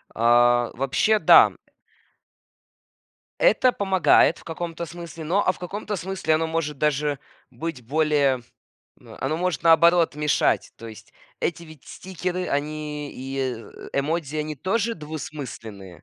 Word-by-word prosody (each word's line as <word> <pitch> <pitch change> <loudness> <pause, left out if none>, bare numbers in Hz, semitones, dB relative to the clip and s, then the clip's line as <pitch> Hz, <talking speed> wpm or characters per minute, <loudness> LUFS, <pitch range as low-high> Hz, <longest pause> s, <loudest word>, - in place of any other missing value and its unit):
А, 120 +1 +4
вообще, 135 - +1
да, - - +8
м. - - -10 1.8
Это - - +4
помогает 190 -4 +3
в - - -17
каком-то 170 0 -5
смысле, 170 0 -9
но 190 +6 +1
а 185 - +4
в - - -16
каком-то 205 +4 -5
смысле 190 -3 -1
оно 160 +1 0
может 160 -3 -2
даже 150 -1 0 0.3
быть 135 +1 -6
более 145 -2 +2 0.6
но - - -15
оно 135 +5 -2
может, 180 -4 -1
наоборот, 170 0 +5
мешать. 150 0 +1
То 115 - -10
есть 110 -2 -12 0.3
эти 170 0 -2
ведь 155 -4 -14
стикеры, 180 0 -5
они 150 0 -3
и, 135 +1 -6
э, 125 -4 -5
эмодзи, 155 +1 -2
они 155 -1 -3
тоже 220 - -1
двусмысленные. 120 - -8
155 Hz, 135 wpm, -24 LUFS, 135-175 Hz, 1.8 s, да